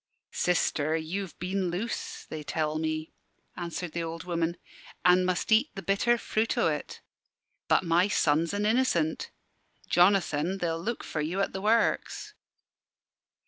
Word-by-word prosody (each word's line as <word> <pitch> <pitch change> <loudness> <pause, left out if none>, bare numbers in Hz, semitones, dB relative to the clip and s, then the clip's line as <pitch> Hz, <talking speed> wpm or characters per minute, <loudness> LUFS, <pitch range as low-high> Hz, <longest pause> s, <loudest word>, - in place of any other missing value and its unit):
"Sister, 160 -3 +1
you've 175 +4 -4
been 185 +1 -1
loose, 200 +7 -4
they 155 - -6
tell 155 +1 -1
me," 155 0 -3 0.4
answered 175 -1 -4
the 170 - -3
old 165 0 -5
woman, 170 -1 -1 0.5
"an' 180 +1 +6
must 185 +4 -1
eat 230 +7 +5
the 195 - -6
bitter 235 +5 +2
fruit 225 -1 -1
o't. - - -1 0.7
But - - +3
my 175 +2 +3
son's 160 -4 +2
an 205 +1 -1
innocent. 215 -9 +1 0.6
Jonathan, 175 -1 +3
they'll 165 -3 -2
look 230 +5 -3
for 155 - -3
you 165 +6 -2
at 195 - 0
the 190 - -4
works." 230 - +1
175 Hz, 140 wpm, -28 LUFS, 160-195 Hz, 0.7 s, an